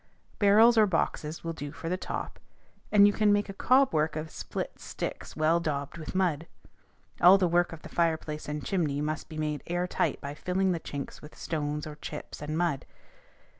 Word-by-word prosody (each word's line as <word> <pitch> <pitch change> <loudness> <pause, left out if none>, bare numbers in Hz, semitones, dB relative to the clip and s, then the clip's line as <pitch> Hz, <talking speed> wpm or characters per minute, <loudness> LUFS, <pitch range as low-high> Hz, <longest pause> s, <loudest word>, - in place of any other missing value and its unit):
Barrels 220 +3 +6
or 215 - +6
boxes 165 -3 -1
will 165 0 -3
do 145 -3 -6
for 165 - -8
the 180 - 0
top, 185 - -5 0.5
or 210 - +3
you 205 0 +7
can 210 -1 +3
make 205 0 +2
a - - -5
cob 255 +5 +3
work 155 0 +1
of 155 0 -4
split - - -5
sticks - - -6
well 160 +2 +3
daubed 145 -1 -3
with 155 - -7
mud. 170 -4 +1 0.7
All 180 +3 +9
the 185 -2 +2
work 175 +1 +2
of 165 -1 -10
the - - -8
fireplace 160 -3 -1
and 150 0 -4
chimney 155 -8 0
must 155 +1 -3
be 155 - -8
made 150 -1 -2
air 175 +1 0
tight 180 - -1
by 140 0 -6
filling 185 +4 0
the 170 - -1
chinks 140 -3 -7
with 150 - -13
stones 150 -2 -3
or 150 -1 -8
chips 150 -1 -8
and 150 +1 -3
mud. 165 -6 0
165 Hz, 200 wpm, -29 LUFS, 150-185 Hz, 0.7 s, All